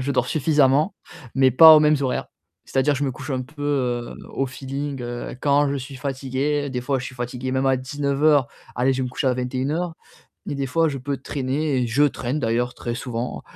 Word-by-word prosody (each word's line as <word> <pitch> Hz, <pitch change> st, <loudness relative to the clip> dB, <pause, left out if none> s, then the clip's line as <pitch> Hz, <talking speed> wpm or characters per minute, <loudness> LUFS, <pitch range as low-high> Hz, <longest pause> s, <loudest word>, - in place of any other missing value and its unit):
je 135 Hz, +2 st, -2 dB
dors 135 Hz, -, +1 dB
suffisamment, 150 Hz, +1 st, +2 dB, 0.4 s
mais 135 Hz, -1 st, +4 dB
pas 160 Hz, +5 st, +10 dB
aux -, -, +6 dB
mêmes 150 Hz, 0 st, +4 dB
horaires. 130 Hz, -2 st, -1 dB, 0.4 s
C'est -, -, -3 dB
à 130 Hz, -, +5 dB
dire, 145 Hz, +2 st, +2 dB
je 145 Hz, +1 st, -1 dB
me 135 Hz, -, -1 dB
couche -, -, -9 dB
un 130 Hz, -1 st, -1 dB
peu, 145 Hz, +3 st, -11 dB
heu, 125 Hz, -5 st, -1 dB, 0.2 s
au 135 Hz, -, -1 dB
feeling, 135 Hz, +1 st, -5 dB
heu, 120 Hz, +1 st, -5 dB
quand 145 Hz, 0 st, +3 dB
je 140 Hz, -, -1 dB
suis 135 Hz, +1 st, -7 dB
fatigué. 140 Hz, +2 st, -2 dB
Des 125 Hz, -, -3 dB
fois 135 Hz, +2 st, -1 dB
je 125 Hz, -, -5 dB
suis 130 Hz, -, -7 dB
fatigué 125 Hz, +1 st, -4 dB
même 130 Hz, +1 st, +1 dB
à 135 Hz, 0 st, +3 dB
19:00, 140 Hz, +1 st, +1 dB, 0.3 s
allez, 130 Hz, +2 st, +2 dB
je 130 Hz, -, -1 dB
vais -, -, 0 dB
me 125 Hz, -, -4 dB
coucher 130 Hz, -, -2 dB
à 130 Hz, -, +3 dB
21:00. 135 Hz, +7 st, -2 dB, 0.5 s
Et -, -, -2 dB
des 140 Hz, -1 st, -2 dB
fois 165 Hz, +5 st, +2 dB
je 140 Hz, -, -3 dB
peux 140 Hz, +1 st, -3 dB
traîner 140 Hz, +2 st, -2 dB
et 120 Hz, -, 0 dB
je 135 Hz, +6 st, +3 dB
traîne 135 Hz, -1 st, -1 dB
d'ailleurs, 120 Hz, +1 st, 0 dB
très 120 Hz, -1 st, -5 dB
souvent 120 Hz, -1 st, -4 dB
135 Hz, 225 wpm, -23 LUFS, 125-145 Hz, 0.5 s, pas